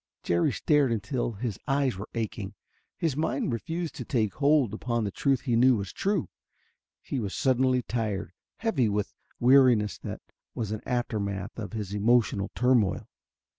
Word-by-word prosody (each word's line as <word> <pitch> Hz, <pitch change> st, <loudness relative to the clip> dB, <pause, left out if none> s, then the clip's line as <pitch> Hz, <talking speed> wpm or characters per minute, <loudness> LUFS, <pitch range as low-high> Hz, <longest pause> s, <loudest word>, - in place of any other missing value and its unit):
Jerry 85 Hz, 0 st, +2 dB
stared 145 Hz, -5 st, +2 dB
until 115 Hz, +2 st, -1 dB
his 110 Hz, -1 st, -4 dB
eyes 135 Hz, -4 st, +1 dB
were 100 Hz, +3 st, -7 dB
aching. 105 Hz, -3 st, -4 dB, 0.4 s
His 160 Hz, -5 st, 0 dB
mind 140 Hz, -4 st, -1 dB
refused 165 Hz, +8 st, -3 dB
to -, -, -4 dB
take 110 Hz, -6 st, 0 dB
hold 145 Hz, -6 st, +3 dB
upon 120 Hz, +1 st, -1 dB
the 100 Hz, -, -2 dB
truth 135 Hz, +5 st, +1 dB
he 120 Hz, -4 st, 0 dB
knew 125 Hz, +2 st, +5 dB
was 100 Hz, -3 st, -4 dB
true. 200 Hz, -4 st, 0 dB, 0.8 s
He 135 Hz, -, -3 dB
was 100 Hz, -4 st, -3 dB
suddenly 130 Hz, -1 st, +2 dB
tired, 105 Hz, -7 st, -2 dB, 0.2 s
heavy 155 Hz, -, +1 dB
with 105 Hz, 0 st, -2 dB, 0.3 s
weariness 120 Hz, -, +5 dB
that -, -, -7 dB, 0.3 s
was 110 Hz, -3 st, -3 dB
an 110 Hz, -, -3 dB
aftermath 105 Hz, -6 st, -2 dB
of 110 Hz, 0 st, -6 dB
his 105 Hz, -3 st, -4 dB
emotional 105 Hz, -1 st, +2 dB
turmoil. 125 Hz, -6 st, +2 dB
120 Hz, 155 wpm, -28 LUFS, 105-130 Hz, 0.8 s, knew